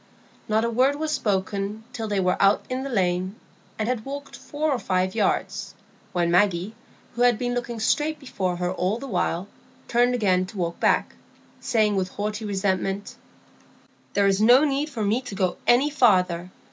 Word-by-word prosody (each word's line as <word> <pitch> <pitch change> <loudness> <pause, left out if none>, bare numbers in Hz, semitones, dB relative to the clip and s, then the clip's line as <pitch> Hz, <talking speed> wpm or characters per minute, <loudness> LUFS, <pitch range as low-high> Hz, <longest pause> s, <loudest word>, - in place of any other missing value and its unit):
Not 220 +1 +2
a - - 0
word 260 +5 +3
was 310 +1 -2
spoken 200 -2 -1
till 225 -4 -4
they 205 -2 0
were 180 -1 +1
out 200 +1 +4
in 255 +1 -1
the 275 - -4
lane, 185 -3 0 0.4
and 215 - -1
had 245 -3 -1
walked 280 +2 -7
four 300 +1 -2
or 260 - 0
five 185 -2 0
yards, 220 - -1 0.4
when 175 -1 0
Maggie, 185 +2 +2 0.4
who 240 - -4
had 245 -2 +5
been 245 0 -2
looking 240 -1 -3
straight 300 +7 +1
before 190 -10 -3
her 180 0 -2
all 185 +3 -1
the 265 - -7
while, 185 -5 -1 0.4
turned 245 +1 +3
again 185 -5 +2
to 205 - -11
walk 170 -2 -2
back, - - +2 0.5
saying, 215 -3 +1
with 185 -1 -1
haughty 210 +2 -4
resentment,— 195 0 -1 1.0
"There 200 - +3
is 195 +1 +2
no 245 +6 +7
need 290 +1 0
for 235 -7 -4
me 215 +5 +1
to 230 -6 -8
go 185 -2 0
any 265 +5 +4
farther. 185 - +2
210 Hz, 180 wpm, -24 LUFS, 190-245 Hz, 1.0 s, no